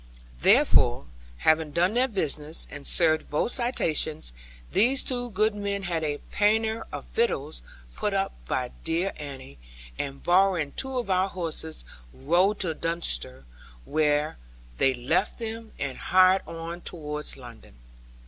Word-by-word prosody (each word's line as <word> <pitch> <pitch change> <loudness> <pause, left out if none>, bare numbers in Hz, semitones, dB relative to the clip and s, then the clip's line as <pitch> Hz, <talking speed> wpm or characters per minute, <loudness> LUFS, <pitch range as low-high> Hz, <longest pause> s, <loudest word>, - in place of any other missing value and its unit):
Therefore, - - +4 0.3
having 155 - +3
done 180 +5 +2
their 250 +2 +3
business, 155 - -2
and 145 -1 -4
served 160 -2 +4
both 150 +10 +1
citations, 155 - 0 0.4
these 260 +4 +3
two 245 -1 -2
good 215 +1 +2
men 200 -1 -3
had 170 -3 -1
a 145 -1 -1
pannier 220 +2 +1
of - - -6
victuals - - -1 0.3
put 210 - -1
up 195 0 0
by 125 -1 -1
dear 170 +4 0
Annie, 135 - -9 0.4
and 140 -1 -4
borrowing 180 -4 +3
two 265 - -4
of 235 -6 -2
our 185 +1 +2
horses, 160 - -5 0.3
rode 175 - +2
to 170 -5 -1
Dunster, 65 - -2 0.4
where 150 - +1 0.4
they 135 -1 +4
left 155 +11 0
them, 225 -1 -6
and 135 -2 -4
hired 185 +1 +5
on 165 +1 -6
towards 150 -4 -6
London. 120 - -13
170 Hz, 135 wpm, -27 LUFS, 150-200 Hz, 0.4 s, hired